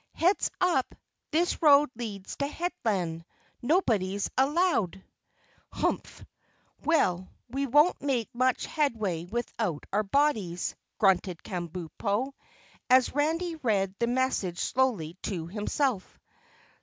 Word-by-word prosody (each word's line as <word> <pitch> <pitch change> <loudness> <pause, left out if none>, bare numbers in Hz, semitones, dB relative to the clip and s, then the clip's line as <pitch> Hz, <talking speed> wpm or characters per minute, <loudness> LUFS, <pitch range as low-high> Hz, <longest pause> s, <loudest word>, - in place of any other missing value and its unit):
"Heads 365 +4 +2
up! 355 -8 +1 0.3
This 340 +2 +1
road 295 -2 +6
leads 210 -5 -6
to 280 - 0
Headland, 210 - -2 0.4
nobody's 215 - +1
allowed." 270 - +1 0.7
"Humph! - - -2 0.6
Well, 185 - +2 0.2
we 275 +2 -1
won't 295 +7 +4
make 255 -6 -1
much 255 +1 +1
headway 215 - -1
without 215 -5 -3
our 210 - +3
bodies," 210 - 0 0.2
grunted 185 -3 +2
Kabumpo, 185 - -3 0.6
as 255 0 +5
Randy 325 +4 0
read 200 -9 0
the 235 - +1
message 240 -8 0
slowly 200 -12 0
to 175 -6 -3
himself. 210 - -2
235 Hz, 105 wpm, -28 LUFS, 190-290 Hz, 0.7 s, road